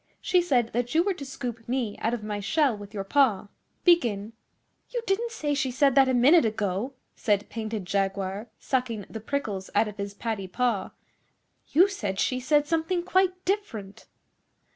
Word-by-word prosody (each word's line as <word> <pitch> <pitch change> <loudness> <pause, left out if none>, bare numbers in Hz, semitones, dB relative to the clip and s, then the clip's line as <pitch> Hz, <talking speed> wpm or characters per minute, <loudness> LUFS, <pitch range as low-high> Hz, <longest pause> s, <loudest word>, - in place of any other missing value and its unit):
She 360 - +3
said 250 -9 +1
that 245 +3 -1
you 330 - +5
were 395 +1 +1
to 320 - -8
scoop 240 -4 -6
me 245 -5 -1
out 225 - 0
of 220 - -8
my 210 -1 -3
shell 275 +4 +2
with 205 -1 -10
your 200 -3 -4
paw. 215 -3 +2 0.3
Begin.' 230 - +3 0.6
'You 480 -2 -3
didn't 455 +4 0
say 300 -10 -2
she 275 -2 0
said 275 +2 +3
that 270 -1 +5
a - - +2
minute 280 +7 +6
ago, 215 +2 -1 0.2
said 205 -2 0
Painted 220 -3 -4
Jaguar, 195 +2 -1
sucking 240 -6 -2
the 220 - -5
prickles 215 -7 -3
out 220 - +4
of 210 - -8
his 200 0 -5
paddy 215 -3 -3
paw. 220 -1 0 0.8
'You 355 +6 +5
said 205 - -3
she 255 - +1
said 295 +3 +3
something 330 +3 0
quite 370 0 +1
different. 230 - -3
240 Hz, 175 wpm, -27 LUFS, 205-295 Hz, 0.8 s, minute